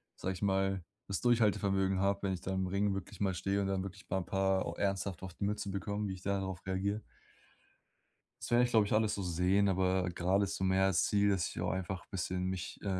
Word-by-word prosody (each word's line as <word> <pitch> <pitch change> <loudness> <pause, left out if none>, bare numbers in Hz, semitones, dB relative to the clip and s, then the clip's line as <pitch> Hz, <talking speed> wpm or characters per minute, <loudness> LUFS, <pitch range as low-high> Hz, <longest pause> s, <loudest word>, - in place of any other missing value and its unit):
sage 95 - -3
ich 90 - -9
mal, 95 -2 +1 0.2
das 100 - -2
Durchhaltevermögen 100 -5 +2
habe, 100 +1 +1
wenn 95 -1 +1
ich 90 - -5
da 95 - -4
im 95 0 0
Ring 100 +1 +1
wirklich 95 - -7
mal 95 -2 +1
stehe 100 +2 0
und 95 - 0
dann 95 -1 0
wirklich 100 +1 -8
'n 95 -2 -1
paar 95 0 +1
au 85 - -3
ernsthaft 95 -2 -1
auf 95 -2 -7
die - - -5
Mütze 100 -1 -1
bekomme, 100 +2 -2
wie 95 - -3
ich 95 - -9
da 100 0 0
darauf 95 -2 -5
reagiere. 100 +3 -1 1.5
Das - - -9
werde 120 +1 +5
ich, 120 - -2
glaube 110 -3 +4
ich, - - -2
alles 110 -1 +2
so 100 - -3
sehen, 90 +4 +2
aber 95 0 +2
grade 95 +4 +2
ist 100 +1 -2
so - - -3
mehr 95 0 +3
das 95 - +2
Ziel, 100 0 +3
dass 95 -5 +1
ich - - -7
auch - - 0
einfach 95 0 -3
bisschen 90 -1 -2
mich, 95 -1 -4
äh, - - -8
95 Hz, 240 wpm, -33 LUFS, 95-100 Hz, 1.5 s, werde